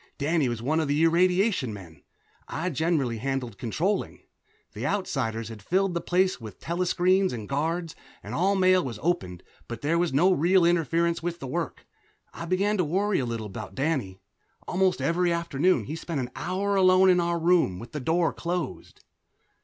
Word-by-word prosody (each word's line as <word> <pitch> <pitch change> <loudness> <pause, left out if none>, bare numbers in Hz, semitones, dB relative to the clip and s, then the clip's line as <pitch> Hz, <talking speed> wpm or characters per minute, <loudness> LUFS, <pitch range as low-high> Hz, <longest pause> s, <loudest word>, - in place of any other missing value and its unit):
Danny 150 -2 +1
was 120 -1 -4
one 155 +5 +1
of 155 - 0
the 145 +3 +1
irradiation 180 - +2
men; 85 -7 -11 0.5
I 180 +4 -3
generally 140 -6 0
handled 130 -4 -3
controlling. 170 - -2 0.5
The - - -6
Outsiders 115 - -2
had 110 -2 -9
filled 185 - +1
the 170 - -2
place 185 -3 +1
with 105 -5 -10
telescreens 180 +2 +1
and 110 -4 -6
guards, 165 +4 -2 0.3
and - - -7
all 195 +3 +2
mail 185 -1 +4
was 120 -5 -5
opened, 95 - -1 0.2
but 120 - -7
there 165 +4 +1
was 175 -3 +1
no 175 +8 +4
real 180 +2 +3
interference 170 0 +1
with 170 0 -4
the - - -7
work. 165 +6 -4 0.5
I 170 - -6
began 195 +4 +1
to 180 - +2
worry 195 +6 0
a 125 - -2
little 115 -2 -4
about 105 +1 -8
Danny. 135 -10 -2 0.5
Almost 185 0 +1
every 175 +1 +1
afternoon 170 +1 +1
he 150 - -5
spent 165 -2 -4
an 125 -1 -4
hour 200 +2 -1
alone 185 0 +5
in 180 -1 +5
our 170 0 0
room, 165 - +2
with 115 +4 -10
the 150 - -4
door 165 +5 +1
closed. 175 -4 -5
165 Hz, 175 wpm, -26 LUFS, 130-180 Hz, 0.5 s, alone